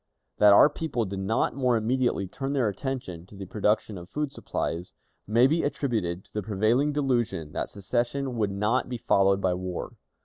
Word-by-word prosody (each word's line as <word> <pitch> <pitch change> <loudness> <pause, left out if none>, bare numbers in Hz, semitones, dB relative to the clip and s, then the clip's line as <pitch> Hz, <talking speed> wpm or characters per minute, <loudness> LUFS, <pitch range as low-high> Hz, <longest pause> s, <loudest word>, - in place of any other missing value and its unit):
That 105 -1 +7
our 100 - +8
people 145 -6 -2
did 95 0 -5
not 95 +4 0
more 125 -2 +2
immediately 120 -2 0
turn 135 +8 -4
their 130 -5 +2
attention 100 - -4
to 100 - -14
the 95 0 -7
production 105 0 0
of 85 +1 -12
food 150 +2 -2
supplies, 85 -7 -4 0.3
may 115 +4 +5
be 160 +5 +3
attributed 110 -11 -2
to - - -23
the 105 - -2
prevailing 110 +8 +1
delusion 120 - -1
that - - -3
secession 120 +6 -2
would 105 -3 0
not 105 +5 0
be 125 - -3
followed 100 -3 +3
by 95 -2 +2
war. 90 0 -5
110 Hz, 180 wpm, -27 LUFS, 95-130 Hz, 0.3 s, our